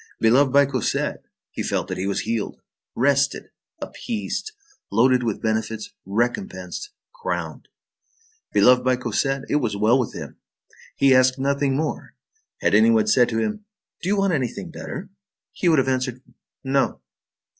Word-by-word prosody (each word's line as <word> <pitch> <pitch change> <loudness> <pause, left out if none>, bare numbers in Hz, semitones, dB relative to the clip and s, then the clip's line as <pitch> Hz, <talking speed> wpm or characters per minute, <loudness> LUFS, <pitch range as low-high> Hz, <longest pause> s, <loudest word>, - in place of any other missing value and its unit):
Beloved 130 +5 +4
by 140 +1 +6
Cosette, 130 -4 -1 0.3
he - - -5
felt - - -1
that - - -3
he 95 - -1
was 100 - -1
healed, 115 -2 -3 0.4
rested, 140 +2 +1 0.3
appeased, 240 - -4 0.4
loaded 125 +4 +4
with 115 -4 -3
benefits, 110 - -2 0.2
recompensed, 100 - -2 0.2
crowned. - - -4 0.8
Beloved 125 +5 +5
by 130 0 +3
Cosette, 130 +3 -1
it - - +1
was 115 -8 -1
well 110 +5 +4
with 125 - -2
him! - - -8 0.6
He 135 -1 +4
asked 130 0 +4
nothing 140 0 0
more! 155 +1 -3 0.5
Had - - +2
any 225 - +6
one 225 -2 +4
said 130 - +4
to 110 - -2
him: 215 - -2 0.4
"Do 185 - -2
you 205 - +2
want 195 -2 +2
anything 140 +4 -3
better?" 190 +3 -7 0.4
he 180 - +1
would 160 - +4
have 135 - +2
answered: 130 -1 -1 0.4
"No." 135 0 +1
130 Hz, 150 wpm, -23 LUFS, 115-145 Hz, 0.8 s, by